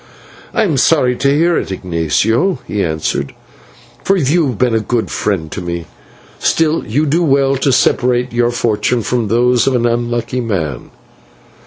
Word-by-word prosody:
"I 225 - +1
am 165 -9 0
sorry 130 -3 +3
to 140 - +1
hear 165 +5 +2
it, - - -6
Ignatio," 95 - 0
he 105 -2 -2
answered, 80 -3 -2 0.7
"for 195 - +2
you 160 +1 +2
have 125 -5 -3
been 125 0 +1
a 110 - +2
good 115 +2 -2
friend 85 -7 -2
to 100 - -5
me. 85 -1 -4 0.5
Still, 160 0 +1
you 140 +9 0
do 155 +4 +1
well 140 -2 +2
to 135 +1 +1
separate 125 -1 +1
your 120 0 +2
fortunes 120 0 0
from 120 -3 0
those 120 +2 +2
of 135 - +2
an 120 -1 +1
unlucky 120 +1 -1
man." 80 - -3
120 Hz, 165 wpm, -15 LUFS, 105-140 Hz, 0.7 s, sorry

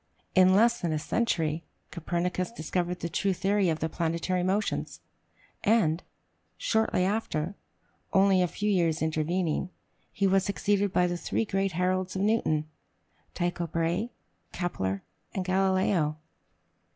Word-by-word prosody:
In 185 0 +6
less 235 +3 +4
then 170 - 0
a - - +1
century, 160 -2 0 0.3
Copernicus 180 +3 -2
discovered 180 -2 -2
the 170 - -1
true 190 +4 0
theory 195 0 +1
of 160 -1 -1
the 160 - +1
planetary 170 +2 -1
motions; 195 +4 -1 0.6
and, 195 -7 +3 0.6
shortly 220 -5 +1
after, 190 -5 -1 0.6
only 190 -1 +4
a 180 - +3
few 205 +4 -3
years 170 -4 +2
intervening, 160 +2 0 0.4
he 200 - 0
was 195 0 +4
succeeded 200 0 +1
by 180 - +3
the 175 0 -1
three 225 - -1
great 195 -2 0
heralds 185 +2 0
of 190 - 0
Newton, 155 -8 +1 0.7
Tycho 175 -1 -1
Brahe, 170 +7 -1 0.4
Kepler, 100 - -2 0.3
and 190 - -1
Galileo. 185 -4 +2
180 Hz, 130 wpm, -28 LUFS, 165-195 Hz, 0.7 s, In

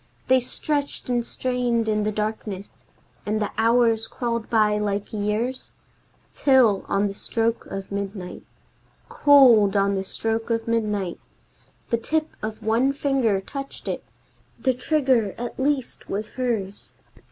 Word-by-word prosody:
They 260 0 +6
stretched 285 +1 -3
and 240 -1 +1
strained 245 -2 -1
in 210 -1 +1
the 215 - +1
darkness, 210 -2 -5 0.4
and 215 +1 -1
the 210 - -2
hours 230 0 +3
crawled 235 -2 -3
by 210 -2 +3
like 205 0 -2
years, 215 +5 -2 0.6
Till, 255 -8 +4
on 200 +1 +1
the 200 - -2
stroke 230 +3 -2
of 195 0 -6
midnight, 200 -2 -5 0.7
Cold 265 - +6
on 200 0 +2
the 190 -1 -1
stroke 225 +4 -3
of 230 0 -1
midnight, 210 -5 -1 0.7
The 235 - +3
tip 310 +6 -1
of 215 0 -5
one 235 +5 +2
finger 265 -8 +1
touched 275 +7 -8
it! - - -3 0.6
The 260 - +2
trigger 255 -6 +1
at 240 +2 -6
least 270 -1 -1
was 210 +2 -3
hers! 220 -6 -3
225 Hz, 135 wpm, -24 LUFS, 210-255 Hz, 0.7 s, They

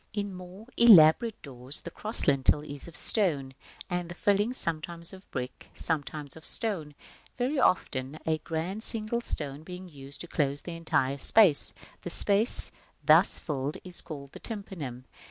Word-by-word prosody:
In 205 -2 -5
more 185 +3 -13
elaborate 215 0 +5
doors 130 0 0
the - - -10
cross 215 +2 -2
lintel 140 +1 +1
is 145 0 -11
of 170 - -12
stone, 145 - +6 0.3
and 175 -1 -5
the 175 - -9
filling 205 +5 -1
sometimes 170 -5 +1
of 190 +1 -16
brick, 125 0 -8
sometimes 150 -2 -5
of 160 - -14
stone, 165 -11 -2 0.4
very 260 +4 -2
often 135 - -2
a 160 -1 -2
grand 170 +7 -6
single 225 +1 -2
stone 145 -9 -7
being 180 +3 -11
used 140 -3 -10
to 175 - -8
close 145 -3 -3
the 170 - -8
entire 140 -4 -2
space: 190 -3 +5 0.3
the - - -8
space 205 +6 +5 0.3
thus - - +3
filled 145 -1 -5
is 180 -1 -7
called 140 -4 -11
the - - -13
Tympanum. 165 - -8
165 Hz, 155 wpm, -26 LUFS, 145-200 Hz, 0.4 s, stone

